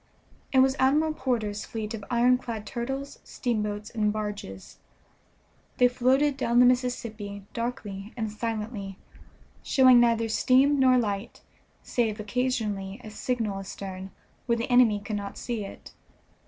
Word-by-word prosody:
It 265 - +5
was 265 0 +3
Admiral 300 +4 +3
Porter's 225 -8 -2
fleet 220 -1 -5
of 215 -2 -6
ironclad 240 -2 +1
turtles, 270 +5 -5
steamboats, 210 -4 -3
and 215 -3 +1
barges. 205 - -6 1.0
They 250 - +6
floated 265 +3 +2
down 235 -2 +2
the 250 - +8
Mississippi 230 -5 -1
darkly 220 -4 -5
and 220 -2 -2
silently, 215 -3 -4 0.6
showing 255 -2 +6
neither 230 -1 +3
steam 265 +5 +3
nor 255 -1 +5
light, 205 -2 -2 0.4
save 225 -3 -1
occasionally 210 -3 -2
a 215 - -9
signal 220 -3 -2
astern, 190 -1 -7 0.4
where 235 -1 +2
the 235 +3 -3
enemy 240 -4 +5
could 205 +1 -4
not 200 -1 -6
see 235 -4 -3
it. 195 - -10
230 Hz, 130 wpm, -27 LUFS, 210-250 Hz, 1.0 s, the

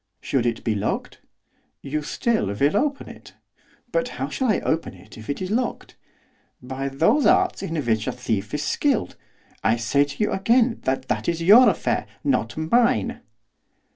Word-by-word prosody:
'Should 125 -3 0
it 115 -1 -2
be 115 - 0
locked?' 105 0 -3 0.6
'You 150 +2 -2
still 225 - -1
will 135 - +1
open 280 +5 0
it.' - - -13 0.6
'But - - 0
how - - -3
shall 260 - -1
I 210 - +2
open 160 -10 -2
it 95 +4 -15
if 110 -1 -12
it 145 +6 -3
is 185 - -4
locked?' 240 +2 -2 0.6
'By 130 +2 -5
those 190 - +2
arts 370 +1 +3
in 165 -4 -4
which 110 -2 0
a - - +1
thief 110 -5 -3
is 150 - -2
skilled. 280 -6 0 0.5
I 110 - +3
say 120 +5 +1
to 145 +9 -3
you - - 0
again 230 +4 +2
that 130 0 -1
that 105 +6 -1
is 170 0 -2
your 220 +8 +8
affair, - - -1 0.2
not 120 - 0
mine. 160 - +1
150 Hz, 170 wpm, -23 LUFS, -, 0.6 s, your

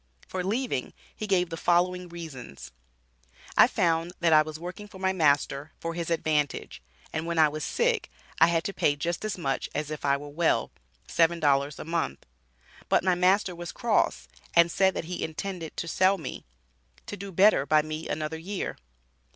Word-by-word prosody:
For 185 -1 -3
leaving, 210 - -2 0.2
he 215 - -5
gave 180 -3 +2
the - - -2
following 180 +1 +1
reasons: 135 - -9 0.8
"I - - +8
found 170 0 0
that 170 -2 +3
I 155 - +8
was 155 0 -5
working 180 +5 -8
for 200 - -13
my 190 0 0
master, 145 -3 +1
for 165 0 -4
his 170 -1 -4
advantage, 150 - -1 0.3
and 160 +1 -2
when 170 0 -2
I 155 -1 +7
was 150 0 -5
sick, - - 0 0.3
I 165 - +7
had 165 -1 +1
to 200 - -3
pay 145 -5 +2
just 170 +5 -3
as 215 -3 -2
much 135 -6 -2
as 150 +1 -2
if 155 - -5
I 140 0 +3
were 145 +1 -9
well 160 +3 +1 0.4
$7 150 -4 +2
a - - -7
month. 165 - -2 0.6
But - - +3
my 185 -1 +3
master 185 +2 +3
was 175 0 -6
cross, - - 0 0.3
and 170 0 +6
said 190 +1 +3
that - - -3
he 180 +2 -4
intended 165 0 -5
to 170 - -3
sell 185 +4 +3
me 160 - -7 0.6
to - - -6
do 200 +1 -8
better 190 -6 +4
by 155 -1 +4
me 155 +1 -5
another 155 +1 -3
year. 190 +4 -4
165 Hz, 185 wpm, -27 LUFS, 155-180 Hz, 0.8 s, I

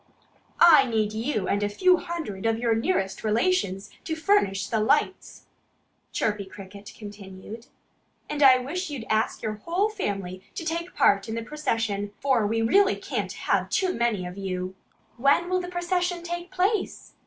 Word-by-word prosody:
"I 310 -5 +8
need 215 -2 0
you 220 -3 -2
and 200 - 0
a 205 - 0
few 365 - +4
hundred 310 - -4
of 225 0 +1
your 230 -1 +1
nearest 195 -3 -1
relations 220 - 0
to 325 -4 -3
furnish 315 - +2
the 220 +1 -1
lights," 285 - 0 0.7
Chirpy 210 -2 -1
Cricket 200 +2 -11
continued. 205 +2 -10 0.6
"And 295 0 -4
I 265 -2 +8
wish 310 +8 -4
you'd 270 -6 -6
ask 220 +1 0
your 215 -1 -4
whole 370 +5 +1
family 195 - -4
to 330 - -5
take 335 +2 -3
part 200 +2 +3
in 220 - -3
the 230 - -3
procession, 225 -7 -2
for 255 -6 +2
we 225 +1 0
really 395 - +4
can't - - -4
have - - 0
too 375 -2 +1
many 230 -6 0
of 180 +2 -7
you." 185 -1 -3 0.4
"When 280 +8 +3
will 370 0 +2
the 355 - -6
procession 355 0 -1
take 345 +1 -5
place?" 380 +3 -1
230 Hz, 165 wpm, -26 LUFS, 205-345 Hz, 0.7 s, I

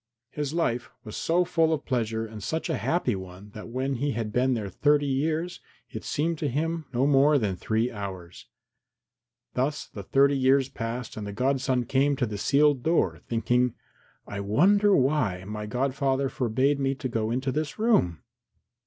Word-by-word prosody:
His 145 -2 -3
life 130 -8 -1
was 110 - -8
so 175 +2 +1
full 165 -2 +2
of 160 - -1
pleasure 115 -4 -1
and 110 -1 -9
such 160 +11 -2
a - - 0
happy 160 - 0
one 95 +2 -9
that 105 - -9
when 130 +3 -2
he 145 +3 -1
had 110 -2 -3
been 130 +1 +2
there 105 -3 -3
thirty 145 +9 +2
years 155 +6 -1 0.3
it - - -6
seemed 160 +2 -1
to 150 - -1
him 160 +4 -2
no 125 +1 +1
more 145 +1 +5
than 105 -7 0
three 110 +6 -1
hours. 95 -5 -8 1.1
Thus 140 +4 -1
the 100 - -9
thirty 140 +7 +3
years 135 0 +3
passed 115 -2 -5
and 105 -1 -5
the - - -4
godson 130 +1 0
came 140 +3 +2
to 130 -2 0
the 105 -3 -5
sealed 145 +3 +3
door, 110 - +1
thinking, 120 +1 +1 0.5
"I 100 - -6
wonder 195 - +4
why 130 -10 +1
my 105 +2 -5
godfather 135 +2 0
forbade 135 +1 +1
me 135 0 0
to 135 -1 -4
go 115 -3 -1
into 130 +3 -1
this 155 +2 -3
room? 215 - +2
130 Hz, 175 wpm, -27 LUFS, 110-145 Hz, 1.1 s, more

